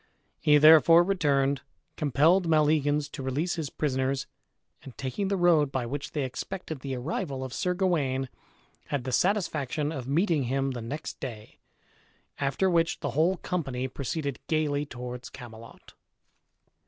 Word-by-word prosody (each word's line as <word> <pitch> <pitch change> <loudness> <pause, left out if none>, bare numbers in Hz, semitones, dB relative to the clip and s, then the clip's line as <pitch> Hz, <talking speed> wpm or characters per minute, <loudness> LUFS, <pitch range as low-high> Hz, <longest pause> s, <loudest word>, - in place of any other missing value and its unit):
He 150 0 +5
therefore 160 +3 +8
returned, 140 -7 +1 0.3
compelled 160 +6 +3
Maleagans 150 -2 +2
to 140 - -7
release 140 +7 -1
his 160 -4 -3
prisoners, 135 -2 -1 0.6
and, 130 - -12
taking 135 +10 -3
the 195 0 0
road 165 -5 +4
by 130 -3 -2
which 140 +4 -5
they 150 - -1
expected 155 +4 -5
the 135 0 -4
arrival 135 +1 -3
of 130 -1 -6
Sir 180 +4 -1
Gawain, 145 -8 0 0.6
had 140 -3 -2
the 130 - -4
satisfaction 155 -5 0
of 135 -6 -5
meeting 155 -1 +1
him 135 +2 0
the 125 -2 -5
next 140 +7 -6
day; 110 -5 -8 0.8
after 140 +7 +1
which 170 -2 +1
the 145 - -2
whole 165 +8 +2
company 135 -9 -3
proceeded 140 +1 -4
gayly 150 -2 0
towards 125 0 -7
Camelot. 115 -1 -12
145 Hz, 140 wpm, -28 LUFS, 130-165 Hz, 0.8 s, therefore